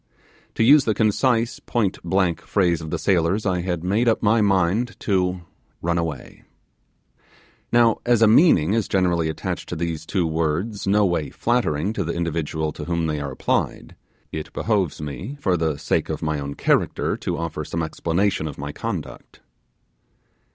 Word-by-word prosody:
To - - +2
use 140 +3 +6
the 110 - +1
concise, 115 +2 +1
pointblank 95 -5 0
phrase 85 -5 +1
of 80 - -6
the - - -2
sailors. 95 +2 +1
I 90 -2 +1
had 85 -2 -3
made 105 +7 +1
up 115 - +2
my 110 +1 +4
mind 100 +4 +1
to 90 -3 0 0.4
'run 85 0 0
away'. 80 -6 -5 1.3
Now 120 -2 +4
as 120 -2 +3
a - - +7
meaning 105 - +5
is 115 -3 0
generally 90 -4 +1
attached 80 - -4
to - - -3
these 80 -1 -4
two 95 -4 0
words 80 +7 -2
no 105 +1 +4
way 85 -5 0
flattering 105 -6 0
to 100 - -2
the 85 - -3
individual 80 -2 -2
to 75 - -7
whom 85 -1 -1
they 75 -2 -1
are 70 - -3
applied, 65 - -2 0.4
it 80 -1 -6
behoves 100 -9 0
me, 95 - -6
for 95 -9 +1
the 80 -3 -1
sake - - -1
of - - -4
my 75 -1 -1
own 70 0 -5
character, - - +1
to - - -3
offer 80 -1 -4
some 80 +2 -3
explanation 85 +2 -1
of 75 - -7
my 70 +1 -5
conduct. - - -6
90 Hz, 165 wpm, -23 LUFS, 80-105 Hz, 1.3 s, a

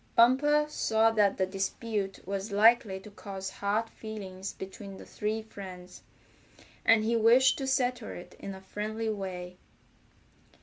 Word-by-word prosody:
Bumper 290 +5 +5
saw 225 -6 +2
that 210 -3 +3
the 190 - +2
dispute 195 +1 -3
was 195 +2 -3
likely 210 -1 +4
to 210 - -12
cause 195 -1 -6
hard 210 +3 -1
feeling 200 -5 -8
between 195 +1 -8
the - - -11
three 215 +1 -3
friends, 185 -4 -10 0.8
and 225 -1 +5
he 230 +2 +1
wished 240 +5 +5
to 270 - -2
settle 250 -3 0
it 175 - -9
in 195 -1 -6
a 190 - -11
friendly 215 +3 -3
way. 180 -3 -5
210 Hz, 140 wpm, -30 LUFS, 195-225 Hz, 0.8 s, Bumper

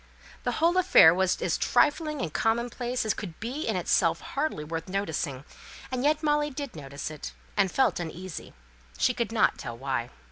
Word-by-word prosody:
The - - +1
whole 340 +3 +2
affair 355 - +7
was 190 0 +1
as - - 0
trifling 300 -1 +2
and 155 - -4
commonplace 240 +2 0
as 215 - +2
could 175 -6 -8
be 255 +8 -4
in - - 0
itself; - - +2
hardly 280 - -3
worth 165 +1 -5
noticing; 160 -8 -2 0.5
and 255 0 -2
yet 305 +2 +2
Molly 295 0 +2
did 280 - -6
notice 140 0 -6
it, 150 - -7 0.2
and 195 -3 +2
felt 265 -7 +2
uneasy; 175 +1 -7 0.4
she - - +3
could - - -2
not - - +2
tell 120 0 -6
why. 130 -2 -2
205 Hz, 175 wpm, -27 LUFS, -, 0.5 s, affair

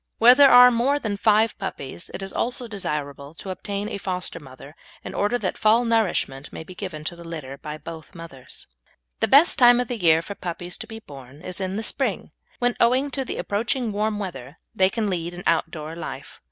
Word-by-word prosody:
Where 240 +2 +8
there 280 +1 +7
are 250 0 +9
more 250 +5 +2
than 220 -7 -3
five 215 +2 +3
puppies 170 -4 -6
it 195 - -6
is 195 - -6
also 245 0 -1
desirable 150 -7 -5
to 190 - -6
obtain 200 +2 -4
a 210 - -5
foster 180 -3 -4
mother 140 +1 -13 0.3
in - - -7
order 210 +4 +1
that - - -3
full 225 +3 +4
nourishment 190 -11 0
may - - -7
be 185 - -11
given 180 -5 -7
to 170 +3 -4
the 170 - -12
litter 155 -5 -7
by 150 0 -6
both 160 +2 -10
mothers. 165 -7 -10 0.5
The - - +2
best 295 +6 +6
time 245 -1 +7
of 245 - -2
the 245 -2 -3
year 165 -1 +4
for 200 - -6
puppies 175 -1 -5
to - - -8
be 220 - -8
born 140 - -13
is 185 +1 -5
in 190 0 -2
the 220 - -3
spring, - - -2 0.3
when, 245 -1 +1
owing 255 +4 +3
to 270 - -2
the 255 - -5
approaching 225 +3 -1
warm 210 +1 -1
weather, 160 -8 -7 0.2
they 190 0 +3
can 215 +1 -2
lead 175 -2 -3
an 180 - -8
outdoor 160 -1 -1
life. 140 -5 -8
190 Hz, 210 wpm, -24 LUFS, 160-230 Hz, 0.5 s, are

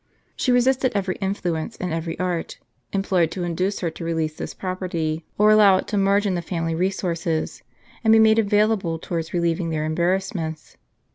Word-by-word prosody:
She 255 - 0
resisted 255 +1 +2
every 195 -2 0
influence, 190 0 -2
and 180 -2 -3
every 165 0 -3
art, 180 -2 -3 0.3
employed 190 -4 +1
to 180 - -4
induce 180 +4 -1
her 170 -3 -1
to 165 - -9
release 160 -2 -1
this - - -6
property, 170 -4 -3
or 210 +1 +5
allow 205 -3 +6
it - - -3
to 210 - -1
merge 200 +1 +3
in 195 - +1
the 175 - -1
family 165 -1 -2
resources, 170 -2 -2 0.4
and 220 - +4
be 225 - +7
made 220 0 +5
available 205 -5 +2
towards 165 0 -4
relieving 170 -1 0
their 155 -1 -1
embarrassments. 170 0 -2
180 Hz, 170 wpm, -23 LUFS, 165-200 Hz, 0.4 s, be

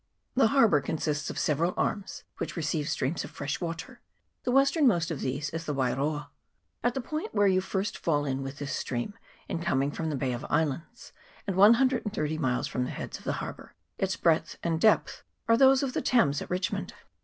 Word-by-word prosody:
The 260 -3 +4
harbour 220 - +4
consists 150 0 -2
of - - -6
several 165 +4 +1
arms, 205 -2 -2 0.2
which - - -4
re 165 - -3
ceive 150 0 -1
streams 140 +5 -1
of - - -7
fresh 140 +4 -4
water; 175 +9 -5 0.4
the 250 - +1
westernmost 270 - +3
of 155 - -4
these 140 +3 -2
is 165 +1 -5
the 150 - -1
Wairoa. 140 +3 -1 0.5
At 245 0 +1
the 265 - -1
point 310 - -4
where 205 -1 +4
you 185 -1 +4
first 190 +1 -2
fall 145 -3 +1
in 135 -1 -1
with 135 +1 -6
this 145 -1 -3
stream 120 +11 -3 0.3
in - - -2
coming 140 -4 +1
from 160 +2 -3
the 150 - -1
Bay 130 -2 -1
of 120 - -5
Islands, 160 - -2 0.3
and 195 - -2
130 210 - +4
miles 130 -4 0
from 125 - -2
the - - -5
heads - - -6
of - - -17
the - - 0
harbour, - - -10 0.2
its 190 -1 0
breadth 165 -1 +1
and 165 -1 0
depth 220 - +3 0.3
are 230 - +6
those 265 +2 +5
of 260 -2 -2
the - - 0
Thames 145 - +3
at - - -7
Richmond. 180 +1 -2
165 Hz, 200 wpm, -28 LUFS, 145-215 Hz, 0.5 s, are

